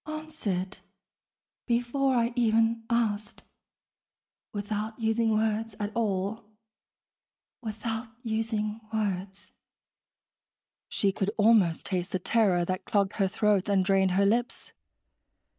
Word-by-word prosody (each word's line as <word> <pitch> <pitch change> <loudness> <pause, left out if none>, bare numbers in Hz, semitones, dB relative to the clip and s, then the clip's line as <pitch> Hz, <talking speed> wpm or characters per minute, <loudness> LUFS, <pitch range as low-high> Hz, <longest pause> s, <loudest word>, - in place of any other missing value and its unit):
(Answered... 305 -12 -4 0.9
before 245 +3 +1
I 235 0 +1
even 225 -1 +2
asked... 215 -3 -1 1.1
without 210 +1 -3
using 225 0 +1
words 220 0 0
at 210 0 -3
all... 210 0 -1 1.2
without 225 +1 -4 0.2
using 220 -1 -2
words....) 200 -2 -3 1.4
She 200 - +2
could 195 +1 -1
almost 210 -6 +4
taste 180 -1 -2
the - - +2
terror 185 -2 +2
that 185 +1 -3
clogged 200 -2 +1
her 195 -2 +3
throat 205 0 +1
and 195 -2 +3
dried 190 -1 +3
her 200 - +4
lips. 235 +4 0
215 Hz, 105 wpm, -28 LUFS, 195-230 Hz, 1.4 s, almost